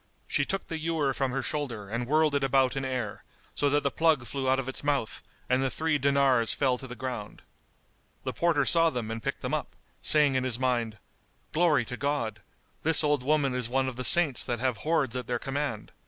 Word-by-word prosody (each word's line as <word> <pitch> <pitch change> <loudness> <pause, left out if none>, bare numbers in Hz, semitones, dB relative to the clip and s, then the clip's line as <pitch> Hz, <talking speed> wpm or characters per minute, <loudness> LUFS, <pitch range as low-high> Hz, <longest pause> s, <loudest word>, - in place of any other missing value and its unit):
She - - 0
took 195 - -3
the 165 -2 -4
ewer 155 -4 0
from 135 -1 -1
her 130 +1 -3
shoulder 125 -10 -4
and 115 +4 -3
whirled 155 +1 +2
it 140 -1 0
about 135 -1 +2
in 135 - -2
air, 125 -5 -4 0.3
so 145 - +1
that 145 +1 +1
the 140 - 0
plug 160 -6 +2
flew 135 +1 -3
out 130 - +3
of 135 -1 -3
its 130 - -4
mouth 140 -6 -1 0.3
and 130 +1 +2
the 135 - +1
three 160 +1 0
dinars 135 -4 +3
fell 130 -3 +1
to 130 - -8
the 125 - -8
ground. 120 -4 -6 0.8
The - - -3
porter 165 -5 +1
saw 165 +7 +5
them 120 -6 -4
and 115 0 -5
picked - - -4
them - - -4
up, - - -3 0.3
saying 150 -3 +4
in 130 -1 0
his 125 -3 -1
mind, 120 -4 -1 0.6
"Glory 155 -7 +3
to 125 0 -6
God! 120 -7 -2 0.4
This 160 0 +3
old 150 -2 +1
woman 140 0 +1
is 125 -2 -2
one 130 +1 0
of 130 - -4
the 125 - -4
Saints 155 -3 +6
that 120 - -2
have 125 -2 -1
hoards 150 -6 0
at 125 -2 -4
their 120 - -1
command! 135 -4 -4
135 Hz, 220 wpm, -28 LUFS, 125-145 Hz, 0.8 s, Saints